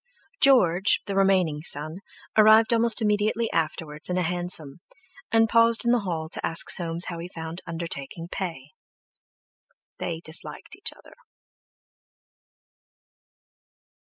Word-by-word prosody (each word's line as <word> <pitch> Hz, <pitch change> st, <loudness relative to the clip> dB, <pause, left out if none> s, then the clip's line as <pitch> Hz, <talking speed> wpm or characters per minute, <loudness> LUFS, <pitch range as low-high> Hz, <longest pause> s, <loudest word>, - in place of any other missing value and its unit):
George, 205 Hz, -, +4 dB
the 200 Hz, -, -4 dB
remaining 190 Hz, -6 st, +2 dB
son, 155 Hz, +3 st, -2 dB, 0.4 s
arrived 220 Hz, +2 st, +6 dB
almost 230 Hz, 0 st, +2 dB
immediately 215 Hz, +2 st, 0 dB
afterwards 155 Hz, -1 st, -3 dB
in 180 Hz, -, -1 dB
a 180 Hz, -, +1 dB
hansom, 175 Hz, -4 st, -1 dB, 0.5 s
and 225 Hz, 0 st, +4 dB
paused 230 Hz, +1 st, +3 dB
in 235 Hz, -, +3 dB
the 245 Hz, -, +3 dB
hall 170 Hz, -6 st, -4 dB
to -, -, -2 dB
ask 165 Hz, -, +1 dB
Soames 170 Hz, 0 st, +1 dB
how 170 Hz, -2 st, -6 dB
he 170 Hz, -, -6 dB
found 165 Hz, 0 st, -7 dB
undertaking 165 Hz, -1 st, -6 dB
pay. 165 Hz, -7 st, -6 dB, 1.3 s
They 165 Hz, -1 st, -4 dB
disliked 160 Hz, 0 st, -4 dB
each -, -, -2 dB
other. -, -, -18 dB
175 Hz, 120 wpm, -25 LUFS, 165-215 Hz, 1.3 s, arrived